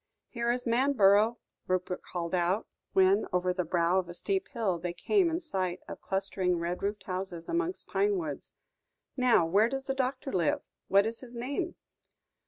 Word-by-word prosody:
"Here 235 -1 -2
is 245 0 -2
Manborough," 230 -3 +4 0.3
Rupert 185 0 -1
called 170 -1 -5
out, 180 +4 +1 0.3
when, 190 +2 +4
over 180 0 +1
the 180 0 -1
brow 175 +2 +2
of 180 -2 -4
a 175 - -7
steep 390 - -1
hill, 210 - -1
they 175 +1 -3
came 380 - +2
in 330 +1 -1
sight 185 - -2
of - - -8
clustering 190 -2 0
red 170 +1 -3
roofed 200 0 -2
houses 185 -2 -4
amongst 350 +2 -1
pine 405 0 +1
woods; 325 -4 -5 0.6
"now 250 -9 +4
where 200 +7 +3
does 270 +1 -3
the 270 - -2
doctor 265 0 -2
live? 170 -4 +1 0.3
What 200 +1 +5
is 225 +1 -3
his 245 -2 -11
name?" 280 +9 -3
200 Hz, 175 wpm, -30 LUFS, 180-265 Hz, 0.6 s, What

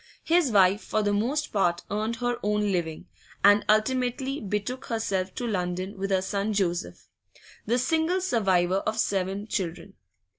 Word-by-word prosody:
His 335 -3 +3
wife 195 0 +4
for 215 - -1
the 205 0 +1
most 265 +9 -1
part 175 -4 +1
earned 215 +3 -1
her 245 0 -2
own 210 0 0
living, 165 -4 -2 0.4
and 205 +1 +6
ultimately 255 +5 +1
betook 210 +5 -3
herself 195 -5 -2
to 245 - -3
London 185 -1 -2
with 195 0 -2
her 190 -1 +1
son 200 +2 -1
Joseph, 180 -3 -2 0.6
the 235 +3 +2
single 320 +7 +1
survivor 190 - +2
of 215 +2 -2
seven 195 -1 -1
children. 195 -2 -4
210 Hz, 150 wpm, -26 LUFS, 190-240 Hz, 0.6 s, and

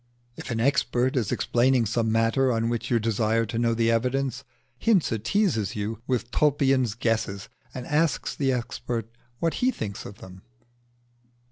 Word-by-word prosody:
If - - -8
an 115 -2 -1
expert 130 -1 +1
is 115 -6 0
explaining 125 0 +2
some 110 +1 0
matter 115 +4 +2
on 115 0 0
which 115 0 -2
you 120 - +3
desire 115 0 +1
to 115 +1 -3
know 115 -1 +2
the 115 0 +2
evidence, 125 +2 0 0.4
Hinze 190 - +2
teases 115 - +1
you 110 +2 -4
with 125 -2 -1
Tulpian's 135 -4 +2
guesses, 110 -4 -1 0.2
and 125 -1 -7
asks 155 +1 0
the 135 -2 +1
expert 115 -2 -3 0.3
what 165 +3 0
he 250 - +4
thinks 105 - -4
of 100 - -11
them. 95 0 -12
120 Hz, 155 wpm, -26 LUFS, 115-135 Hz, 0.4 s, he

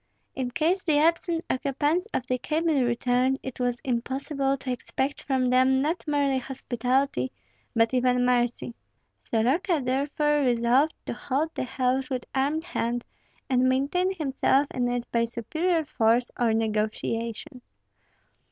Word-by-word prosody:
In 260 -2 -3
case 335 +9 0
the 310 -4 +2
absent 330 +2 +1
occupants 290 +8 0
of 255 - -2
the 255 0 -1
cabin 310 -2 +1
returned, 250 +2 +1
it 260 -1 -7
was 245 -1 0
impossible 270 +2 -1
to 260 -1 -4
expect 265 +3 -3
from 260 -2 0
them 260 +1 +4
not 315 +5 -1
merely 285 -2 +1
hospitality, 250 - -1 0.4
but 225 +1 +3
even 250 0 +2
mercy. 245 -1 0 0.5
Soroka 300 - +1
therefore 295 +3 +1
resolved 250 +3 +2
to - - -3
hold 300 +4 -2
the - - -3
house 255 +2 0
with 255 -3 -3
armed 285 +4 0
hand, 240 -8 -2 0.4
and 255 0 +3
maintain 285 +9 +1
himself 275 -2 +2
in 245 -1 0
it 245 0 -2
by 235 0 +2
superior 315 - -1
force 235 -3 +2
or 235 -2 +3
negotiations. 225 +4 -2
260 Hz, 135 wpm, -26 LUFS, 245-295 Hz, 0.5 s, them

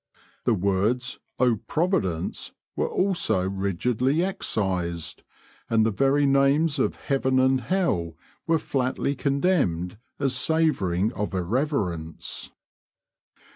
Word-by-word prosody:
The 120 - +3
words 100 +6 0 0.2
"Oh, 125 -3 +3
Providence!" 155 - -1 0.2
were - - 0
also 140 - +1
rigidly 110 - 0
excised, 90 - -2 0.5
and 110 -1 +3
the 110 - +2
very 135 +7 +2
names 140 +3 +3
of - - +1
heaven 130 -1 0
and 130 0 +3
hell 95 - 0 0.3
were 165 0 +4
flatly 135 -1 -1
condemned 135 - 0 0.2
as 135 -2 0
savouring 110 - +1
of 105 -1 -3
irreverence. 90 - -2
125 Hz, 100 wpm, -25 LUFS, 95-140 Hz, 0.5 s, were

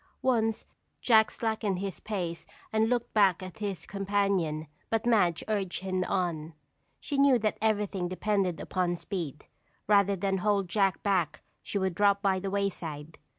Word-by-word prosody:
Once 225 -4 +1 0.3
Jack 220 -3 +5
slackened 220 -4 -1
his 195 -1 -4
pace 180 -6 -4 0.3
and 220 +1 +3
looked 240 -1 -1
back 195 -4 +4
at 185 +4 -9
his 195 -6 -4
companion 195 -6 0 0.2
but 225 +1 0
Madge 180 -9 +3
urged 195 -5 -2
him 185 -1 -1
on. 165 -4 -2 0.4
She 280 - -3
knew 275 -2 +6
that 215 -2 -1
everything 205 -4 0
depended 185 -1 0
upon 180 -2 -1
speed. 165 -5 -5 0.4
Rather 200 -1 +4
than 195 +1 -1
hold 200 -1 +1
Jack 195 0 +1
back 175 -7 0 0.2
she - - -3
would 190 -2 0
drop 200 +2 +3
by 195 -2 +1
the 195 +1 -3
wayside. 165 -6 -3
195 Hz, 150 wpm, -29 LUFS, 180-210 Hz, 0.4 s, knew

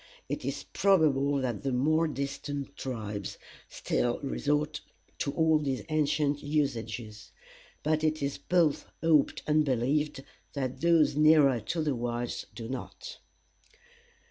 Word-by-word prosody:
It - - -4
is - - -3
probable 150 -8 +3
that 120 -5 -2
the 135 - -1
more 155 +6 +2
distant 140 -1 -4
tribes 105 -6 -5 0.3
still 120 0 -1
resort 145 +2 -1 0.4
to 140 - -1
all 160 -1 +3
these 135 -3 -2
ancient 150 -1 +1
usages; 115 -7 -3 0.5
but 155 +1 +1
it 155 0 +1
is 140 -1 -3
both 170 -5 +1 0.2
hoped 155 -3 +3
and 155 0 +3
believed 140 +2 0 0.3
that 130 -3 -3
those 165 -4 +4
nearer 150 -4 +5
to 155 +9 -2
the 150 -2 +1
whites 120 0 -3
do 115 -2 -6
not. 130 - -7
145 Hz, 125 wpm, -29 LUFS, 125-155 Hz, 0.5 s, nearer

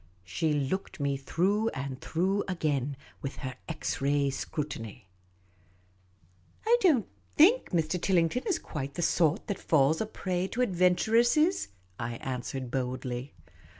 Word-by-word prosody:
She 95 - -1
looked 150 +7 -2
me 140 -1 0
through 190 +11 +1
and 135 -1 -5
through 190 +5 0
again 145 -7 -1 0.2
with 135 - -4
her 130 - -3 0.2
X 160 -3 -3
ray 140 0 +2
scrutiny. 125 -8 -5 0.8
" 90 - -34
I 465 +2 +6
don't 295 - +4 0.3
think 415 +12 +5
Mr. 170 0 0
Tillington 180 +6 +1
is 395 - +2
quite 140 -3 -6
the 175 - -1
sort 160 -2 +2
that 200 - -3
falls 155 0 +3
a 220 - -1
prey 185 -3 -2
to 245 +5 0
adventuresses, 230 - +3
' 90 0 -35
' - - -34
I 120 - -5
answered, 130 0 -4
boldly. 125 -1 -3
150 Hz, 145 wpm, -29 LUFS, 130-190 Hz, 0.8 s, I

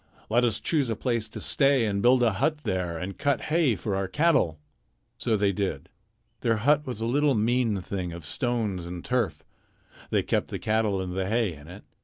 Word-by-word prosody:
Let 120 +2 +4
us 120 -3 +1
choose 145 -7 0
a 115 - 0
place 115 -2 -1
to - - -7
stay 135 -4 +3
and 100 -2 -1
build 125 +2 +5
a 115 -3 +3
hut 150 +8 0
there 90 -6 -2
and 90 +4 -6
cut 145 -1 +1
hay 160 -9 +3
for 100 0 -3
our 95 0 -1
cattle." 145 - +2 0.6
So 115 -3 0
they 100 -1 +2
did. 100 0 -3 0.5
Their 115 -2 +1
hut 145 +6 +2
was 120 -4 -4
a - - 0
little 140 +3 +2
mean 115 -1 +1
thing 90 -1 -4
of 85 -2 -8
stones 105 - -2
and 85 0 -7
turf. 100 -12 -1 0.7
They - - +1
kept - - 0
the - - -4
cattle 110 -2 0
and 90 -1 -4
the 95 0 -1
hay 110 -4 +1
in 75 0 -13
it. 90 +4 -11
110 Hz, 205 wpm, -27 LUFS, 95-125 Hz, 0.7 s, build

